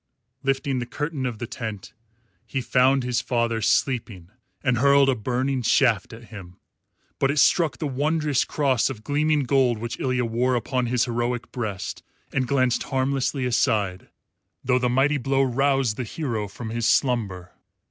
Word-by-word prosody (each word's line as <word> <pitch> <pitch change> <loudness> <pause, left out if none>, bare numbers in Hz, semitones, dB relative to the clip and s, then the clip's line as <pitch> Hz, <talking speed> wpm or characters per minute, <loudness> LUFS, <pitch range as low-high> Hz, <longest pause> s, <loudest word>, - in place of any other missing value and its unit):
Lifting 135 -1 0
the 120 - -4
curtain 145 0 -3
of 120 -3 -5
the 120 - -4
tent, 110 -4 -7 0.5
he 135 - -2
found 130 +2 +3
his 125 -1 0
father 115 -2 -1
sleeping 105 -7 0 0.3
and 125 -4 +1
hurled 140 +1 +5
a - - +4
burning 130 +4 -1
shaft 115 -3 +2
at 115 0 -12
him; 90 -3 -10 0.6
but 135 - +2
it 145 - -1
struck 160 +2 +3
the 155 - -4
wondrous 145 +1 0
cross 135 -5 +1
of 115 -5 -7
gleaming 150 +2 +1
gold 130 -3 +2
which 115 +2 -5
Ilya 125 -2 0
wore 120 +3 +1
upon 125 +1 -1
his 125 +1 +1
heroic 120 0 -2
breast 105 -7 -4 0.3
and 130 -2 0
glanced 130 -3 +1
harmlessly 135 0 0
aside, 100 -6 0 0.5
though 125 0 +2
the 125 -1 +1
mighty 135 +4 +2
blow 135 +2 +1
roused 135 -3 +1
the 130 - -2
hero 115 -4 -3
from 110 +3 -7
his 115 0 0
slumber. 100 -9 0
125 Hz, 160 wpm, -24 LUFS, 115-135 Hz, 0.6 s, hurled